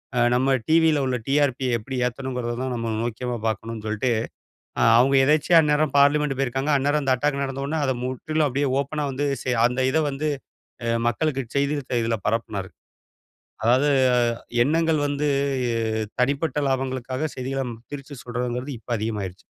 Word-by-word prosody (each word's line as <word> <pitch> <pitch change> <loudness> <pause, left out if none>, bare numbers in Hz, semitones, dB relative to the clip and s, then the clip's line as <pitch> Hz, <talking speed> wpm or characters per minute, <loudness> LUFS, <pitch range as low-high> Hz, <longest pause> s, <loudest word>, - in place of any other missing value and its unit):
அ - - +2 0.2
நம்ம 135 +2 +3
டிவில 160 -3 +4
உள்ள 125 -1 0
டிஆர்பிய 135 -3 +1
எப்படி 130 +4 -6
ஏத்தணும்ங்கிறதான் 125 0 -3
நம்ம 115 -1 -2
நோக்கமா 120 +1 -3
பார்க்கணும் 110 0 -4
சொல்லிட்டு 110 +4 0 0.7
ஆ - - +4 0.2
அவுங்க 135 +3 +4
எதேச்சையா 155 +4 +4
அந்நேரம் 150 -1 +1
பார்லிமென்ட் 145 -1 +3
போயிருக்காங்க. 135 +2 0
அந்நேரம் 145 +2 +1
அந்த 130 -1 +3
அட்டாக் 140 +2 0
நடந்தவுடன 140 +3 -2
அத 130 - +2
முற்றிலும் 150 +4 -1
அப்பிடியே 140 +1 0
ஓப்பனா 150 +2 -3
வந்து 145 +2 -1 0.2
செ - - -2 0.2
அந்த 125 +2 -2
இதவந்து 150 0 0 0.6
அ 115 0 +1
மக்களுக்கு 135 +1 -1
செய்தி 140 +1 +1
தி 120 - +1
இதில 115 0 0
பரப்புனாரு. 105 -4 -2 0.9
அதாவது 125 +5 +4 0.5
அ - - -8 0.3
எண்ணங்கள் 160 +1 +2
வந்து 145 +1 -1 0.9
தனிப்பட்ட 140 +3 0
லாபங்களுக்காக 130 +2 -2
செய்திகள 135 +1 -2 0.3
திரிச்சு 145 0 -7
சொல்றதுங்கிறது 125 +2 -3
இப்ப 115 - -21
அதிகமாயிருச்சு. 105 -4 -4
135 Hz, 140 wpm, -24 LUFS, 125-145 Hz, 0.9 s, டிவில